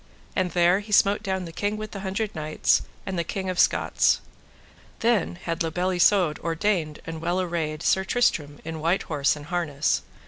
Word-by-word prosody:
And 185 -1 +1
there 175 +2 +4
he 210 +1 -10
smote 200 0 +4
down 190 -3 -2
the 165 - -8
King 205 +5 -2
with 215 0 -6
the 200 - -6
Hundred 195 +2 -3
Knights, 155 -1 +1 0.2
and 190 -2 -3
the - - +1
King 190 +2 -3
of 180 - -4
Scots. - - +3 0.8
Then 225 -6 +2
had 170 -1 -4
La 165 - +1
Beale 180 +3 -1
Isoud 180 -3 +3
ordained 165 -2 -1
and 160 -1 -6
well 175 +2 0
arrayed 165 -4 -2
Sir 190 - +3
Tristram 160 -10 0
in 160 0 -5
white 170 +5 +1
horse 145 -3 +1
and 145 -1 -9
harness. 155 -4 0
175 Hz, 185 wpm, -25 LUFS, 160-195 Hz, 0.8 s, there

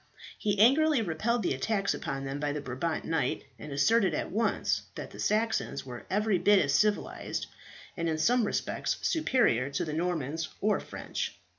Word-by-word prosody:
He 205 -1 -1
angrily 270 +4 +5
repelled 215 +7 0
the - - +1
attack 200 +9 0
upon 135 0 -4
them 135 +1 -4
by 145 0 -1
the 150 - -3
Brabant 145 +4 -3
knight, 160 -1 0 0.2
and 150 - -8
asserted 180 +5 +3
at - - -3
once 220 +3 +1
that - - -7
the - - -11
Saxons 220 -9 0
were 125 -2 -9
every 205 -1 +1
bit 205 +2 +5
as 140 -6 +2
civilized, 210 +4 0 0.5
and 170 0 -1
in 160 - 0
some 235 +7 +3
respects - - -1
superior, 245 - +2
to 140 - -2
the 155 - -4
Normans 160 -2 -2
or 210 +1 +2
French. - - -5
175 Hz, 170 wpm, -29 LUFS, 145-220 Hz, 0.5 s, angrily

